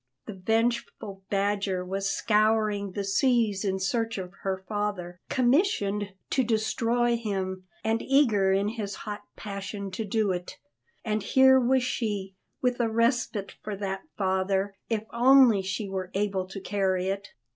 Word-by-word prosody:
The 215 - -6
vengeful 220 -1 -1
Badger 200 -2 0
was 195 +1 -2
scouring 210 -2 +1
the 200 - -2
seas 215 0 +2
in 190 -2 0
search 225 +4 -1
of 185 -1 -6
her 190 -1 -3
father, 205 -4 -3
commissioned 240 - +1 0.2
to 260 - +3
destroy 230 +1 +1
him, 190 -4 -3 0.2
and 225 +1 +1
eager 225 -9 +3
in 200 +2 +2
his 210 -3 -4
hot 210 0 -5
passion 200 -1 -6
to 205 +4 -3
do 210 -1 0
it; 180 0 -5 0.5
and 215 -1 0
here 265 +5 +5
was 255 +1 +2
she, 205 -6 -2 0.3
with 250 -1 +1
a 235 -2 +2
respite 230 -3 0
for 210 -1 -4
that 195 -1 -3 0.2
father, 190 0 0 0.2
if 220 -2 0
only 245 -3 +6
she 190 +2 -3
were 190 -1 -4
able 195 -2 0
to 190 +1 -7
carry 190 -1 0
it. 195 +1 -4
205 Hz, 145 wpm, -27 LUFS, 195-230 Hz, 0.5 s, only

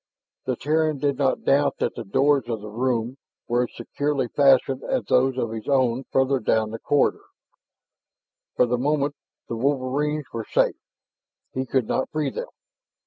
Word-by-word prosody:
The - - +1
Terran 155 0 +1
did 140 0 -1
not 135 -2 +1
doubt 140 +1 +3
that - - -1
the 120 - -6
doors 135 +4 +2
of 115 -2 -2
the 105 0 -8
room 120 +1 -1 0.3
were 120 +1 +2
as - - -15
securely 140 +2 -2
fastened 135 -1 +3
as 260 -1 -1
those 130 0 +2
of 115 -3 -1
his 110 -1 -6
own 130 -2 +2
further 135 0 +2
down 110 -1 +1
the 115 - -6
corridor. 145 +3 +1 1.3
For - - +4
the 120 0 -1
moment 145 +1 +1 0.3
the 115 - -4
wolverines 140 +3 0
were 115 -1 -3
safe; - - +3 0.8
he 130 0 -2
could 130 -1 +1
not 130 - -1
free 150 -3 -1
them. - - -5
130 Hz, 165 wpm, -24 LUFS, 120-145 Hz, 1.3 s, For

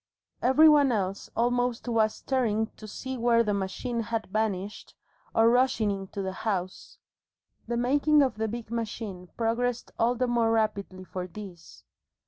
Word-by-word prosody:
Every 265 +6 +6
one 290 -3 +6
else 195 -3 -2
almost 245 +1 0
was 220 -2 +2
staring 220 -5 0
to 215 - -10
see 260 +4 -6
where 235 0 +4
the 210 -2 0
machine 200 +5 -3
had 225 0 -2
vanished, 205 -2 -2 0.4
or 225 0 +5
rushing 245 -4 +2
into 195 0 -5
the 190 - -2
house. 190 -3 -4 0.7
The 235 0 -1
making 285 +4 +4
of 255 -6 -1
the 220 0 -1
big 230 0 -6
machine 215 -5 -4
progressed 240 +1 -1
all 235 +2 +3
the 255 +1 +1
more 235 -2 +2
rapidly 210 -4 -1
for 180 0 -5
this. 185 -2 -11
225 Hz, 150 wpm, -28 LUFS, 205-245 Hz, 0.7 s, Every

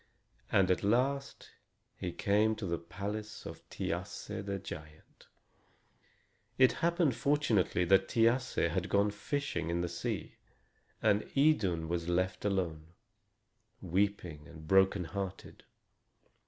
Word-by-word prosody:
And 95 -2 +4
at 90 - +1
last 135 +6 0 0.4
he - - -4
came 105 +2 +2
to 110 -1 -5
the 85 -2 -1
palace 105 +5 -6
of - - -7
Thiasse - - -4
the 100 0 -3
giant. 80 -5 -11 1.3
It 130 -1 +6
happened, 170 -6 +2
fortunately, 120 - +2
that 95 +2 +4
Thiasse 115 -5 +2
had 95 +2 -1
gone 100 +1 +3
fishing 105 - -3
in 85 0 0
the 90 - -1
sea, 85 0 -4 0.7
and 105 +1 +2
Idun 100 - +3
was 85 0 -2
left 90 +2 0
alone, 85 -5 -2 0.9
weeping 90 -5 -1
and 80 -1 -12
broken 95 0 +4
hearted. 95 +2 -6
95 Hz, 115 wpm, -32 LUFS, 85-110 Hz, 1.3 s, It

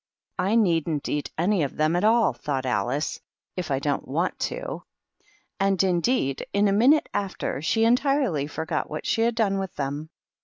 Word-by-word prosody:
"I 195 +4 +2
needn't 165 -8 +1
eat 145 0 -2
any 180 +3 +2
of 140 - -2
them 155 +2 +2
at 175 - +1
all," 220 - +4
thought 130 +2 -3
AHce, 125 +5 -1 0.2
" - - -65
if 180 -3 -4
I 135 - +1
don't 140 +1 -2
want - - -1
to." - - -5 0.8
And, 195 -1 +2
indeed, 175 - +1
in 205 +1 +3
a - - +2
minute 260 +9 +4
after 195 -8 -3
she 225 +8 +2
entirely 245 - +2
forgot 160 +1 -3
what 155 0 -5
she 225 - +1
had 230 0 +2
done 200 -4 +1
with 190 -1 -5
them. 145 +2 -4
180 Hz, 180 wpm, -25 LUFS, 150-220 Hz, 0.8 s, all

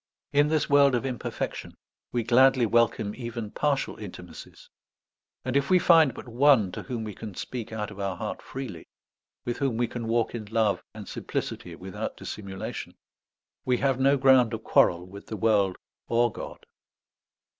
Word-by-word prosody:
In 145 +1 +5
this 155 0 +1
world 140 -2 +5
of 120 - -1
imperfection 130 -3 -4 0.4
we 120 -1 0
gladly 130 +2 +5
welcome 115 -2 +2
even 115 -3 -6
partial 145 -2 0
intimacies. 90 -4 -10 0.8
And 130 0 -2
if 140 0 +2
we 185 - +6
find 165 -7 +5
but - - -9
one 120 -5 +4
to - - -6
whom 120 -4 -4
we 105 -1 -5
can 105 -1 -8
speak 120 +2 -5
out 105 -2 -4
of 100 - -11
our 100 -1 -2
heart - - -5
freely, 125 -11 -7 0.6
with 120 - -3
whom 135 -5 0
we 120 - +2
can 115 -1 -5
walk 115 0 +1
in 115 -3 -5
love 105 -3 +1
and - - -8
simplicity 85 -2 -4
without 95 +2 -6
dissimulation, 100 0 -6 0.7
we 125 -1 +1
have 135 0 +1
no 140 +1 +4
ground 130 -3 +5
of 110 - -9
quarrel 85 0 +3
with 100 +2 -12
the 110 - -5
world 100 -3 +2 0.3
or 120 0 +2
God. - - -9
115 Hz, 165 wpm, -27 LUFS, 105-130 Hz, 0.8 s, we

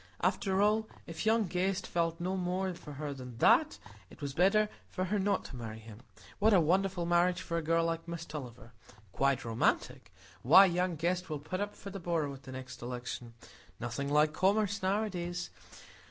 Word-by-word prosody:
After 195 0 +1
all, 215 +1 +2 0.2
if 165 +6 -5
young 225 0 +4
Guest 185 +2 -1
felt 165 -1 -1
no 185 +2 -1
more 185 +1 -1
for 160 -4 -10
her 145 0 -4
than 125 -3 -9
that - - +4 0.3
it - - -15
was 140 -2 -4
better 195 +6 +4 0.2
for 185 - -2
her 205 +3 0
not 200 0 0
to - - -8
marry 110 -3 -6
him. 110 -1 -12 0.4
What 215 0 +5
a - - +7
wonderful 180 +2 +1
marriage 175 +1 +2
for 170 - -4
a 165 - +1
girl 165 +1 +2
like 165 0 -2
Miss 170 0 -5
Tulliver,—quite 120 - -4
romantic? 115 +1 0 0.3
Why, 165 - +8
young 180 -1 0
Guest 175 +3 -1
will 155 - -2
put 185 +7 -4
up 205 0 -3
for 200 - -9
the 195 - -6
borough 165 -5 -1
at 135 - -11
the 130 - -10
next 130 0 -8
election. 120 -1 -6 0.4
Nothing 120 +4 -3
like 150 +1 +4
commerce 205 +3 +1
nowadays! 185 -3 -2
170 Hz, 185 wpm, -32 LUFS, 140-190 Hz, 0.4 s, Why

